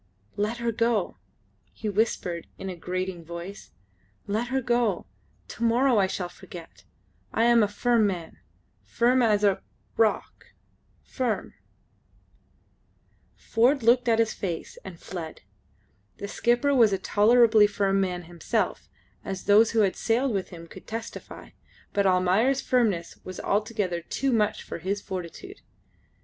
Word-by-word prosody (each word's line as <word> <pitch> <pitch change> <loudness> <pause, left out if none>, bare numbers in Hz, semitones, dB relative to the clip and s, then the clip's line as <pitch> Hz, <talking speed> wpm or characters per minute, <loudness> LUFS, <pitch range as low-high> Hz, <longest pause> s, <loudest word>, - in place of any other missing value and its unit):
"Let 210 +3 -1
her 235 0 -1
go!" 225 - 0 0.5
he 215 - -6
whispered 195 -5 -1
in 195 - -6
a - - -7
grating 180 0 -4
voice. 170 +4 -8 0.6
"Let 215 +4 -1
her 265 +2 0
go. 240 -5 0 0.4
To 235 - -6
morrow 240 +1 +3
I 190 - +3
shall 185 -1 -3
forget. 175 -1 -12 0.5
I 225 - +1
am 235 0 +5
a 210 - +3
firm 225 +1 +2
man,... 175 -4 -5 0.4
firm 250 +2 +2
as 210 -3 +3
a... 200 -2 +3 0.4
rock,... 220 -2 0 0.5
firm.. 245 -5 -3 1.0
." - - -40 0.2
Ford 245 +4 +3
looked 240 +1 +4
at 225 - +4
his 225 -1 +2
face 175 -4 -5
and 180 -3 -10
fled. 165 -4 -7 0.8
The 200 - -5
skipper 240 +7 +1
was 230 -6 +5
a 195 - +1
tolerably 220 +2 +5
firm 195 -1 +1
man 180 -2 -2
himself 170 -1 -2 0.3
as 190 -1 -5
those 210 +3 +5
who 225 - +2
had 195 -3 +2
sailed 245 +4 +1
with 195 -2 -2
him 170 -2 -10
could - - -13
testify 225 +1 -7 0.4
but 200 -1 +2
Almayer's 190 +9 +3
firmness 215 -12 0
was 185 -1 -8
altogether 205 -4 -1
too 270 +9 -1
much 210 -2 +1
for - - -7
his 195 +5 -2
fortitude. 190 - -8
210 Hz, 140 wpm, -26 LUFS, 185-235 Hz, 1.0 s, am